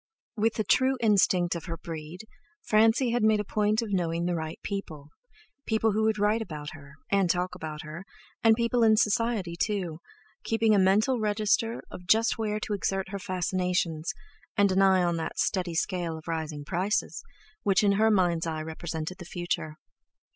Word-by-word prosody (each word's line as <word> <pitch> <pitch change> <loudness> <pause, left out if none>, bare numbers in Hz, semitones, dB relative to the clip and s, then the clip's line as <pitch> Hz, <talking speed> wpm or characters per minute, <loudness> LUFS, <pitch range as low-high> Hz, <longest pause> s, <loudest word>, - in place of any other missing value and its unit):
With 225 +1 +1
the 215 - 0
true 260 +6 +2
instinct 195 -5 +3
of 170 - -6
her 165 -2 -5
breed, 160 +2 -7 0.4
Francie 225 +3 +3
had 240 0 +1
made 215 0 +4
a - - 0
point 210 +2 +1
of 210 -3 -5
knowing 170 -2 0
the 175 - 0
right 160 -1 -4
people—people 220 - -4
who 215 +2 0
would 220 -1 +1
write 210 +2 +2
about 150 -8 -6
her, 145 -3 -13 0.2
and 195 -3 +3
talk 180 +1 0
about 155 -4 -6
her, 155 +4 -8 0.4
and 225 -1 +6
people 235 +1 +1
in 220 -1 +5
Society, 215 -5 +1
too—keeping 210 +4 -2
a 205 - +4
mental 210 +7 +3
register 215 +2 0
of 180 - -10
just 225 +3 +3
where 215 -1 -1
to 210 - -3
exert 195 -1 -2
her 200 0 -5
fascinations, 180 -2 -1 0.5
and 200 -2 +4
an 190 +1 +3
eye 190 -1 +5
on 175 -1 0
that 165 - -4
steady 180 -3 0
scale 170 -2 -1
of 160 - -13
rising 160 -3 -4
prices, 190 +5 -1 0.4
which 200 -1 +2
in 200 - +4
her 215 +3 +3
mind's 175 -5 +2
eye 155 -1 -3
represented 160 +2 -5
the 175 - -8
future. 175 -3 -3
190 Hz, 175 wpm, -27 LUFS, 170-215 Hz, 0.5 s, and